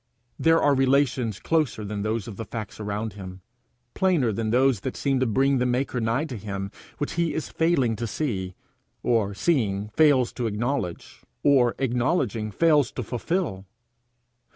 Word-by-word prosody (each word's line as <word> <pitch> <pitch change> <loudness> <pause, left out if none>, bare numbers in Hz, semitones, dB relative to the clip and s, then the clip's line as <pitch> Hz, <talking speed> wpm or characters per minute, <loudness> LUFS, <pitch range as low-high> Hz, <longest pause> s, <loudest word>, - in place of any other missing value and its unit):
There 165 0 +4
are 145 - +4
relations 130 -5 +2
closer 155 -10 0
than 100 0 -4
those 110 +1 -2
of 110 - -7
the 115 - -5
facts 110 -3 -7
around 105 0 -3
him, 95 -2 -9 0.5
plainer 170 -11 +2
than 110 +1 -2
those 125 0 +3
that 130 +5 -5
seem 135 -2 +1
to 130 - +1
bring 135 +4 +2
the 125 - +1
maker 125 0 -1
nigh 115 +7 0
to 130 -7 -6
him, 100 -1 -5 0.3
which 145 - -3
he 165 -2 0
is 160 - -3
failing 150 -9 +1
to 115 +2 -3
see, 95 -9 -3 0.5
or 105 -4 +1
seeing 105 - 0
fails 140 -1 +3
to 120 -2 -2
acknowledge, 110 -3 -3 0.2
or 130 -4 +4
acknowledging 120 - 0
fails 150 +3 +3
to 125 - -4
fulfil. 120 - -2
120 Hz, 160 wpm, -25 LUFS, 105-140 Hz, 0.5 s, There